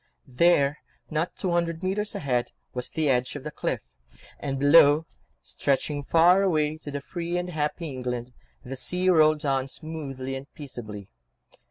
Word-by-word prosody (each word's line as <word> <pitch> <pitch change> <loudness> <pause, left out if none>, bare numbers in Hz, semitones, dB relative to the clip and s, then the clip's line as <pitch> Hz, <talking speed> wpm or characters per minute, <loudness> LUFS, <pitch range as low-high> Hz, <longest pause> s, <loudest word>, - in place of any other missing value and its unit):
There, 140 +1 +3 0.3
not 160 +3 -1
two 185 - -2
hundred 170 -1 0
mètres 205 +3 -1
ahead, 125 -4 -1 0.2
was 125 0 -4
the 155 -2 -1
edge 125 -1 +1
of 145 - -6
the 150 - -5
cliff, - - -2 0.6
and 135 -1 -3
below, 145 +2 +6 0.4
stretching 145 +1 -1
far 175 +6 +5
away 155 -5 +1
to 145 -2 -5
free 170 +4 -3
and 180 0 -3
happy 155 +1 -2
England, 125 -2 -4 0.3
the 130 +2 -5
sea 180 +8 +1
rolled 155 -2 +4
on 135 -1 +1
smoothly 135 -4 -6
and 135 +2 -7
peaceably. 110 -9 -8
150 Hz, 150 wpm, -26 LUFS, 135-165 Hz, 0.6 s, below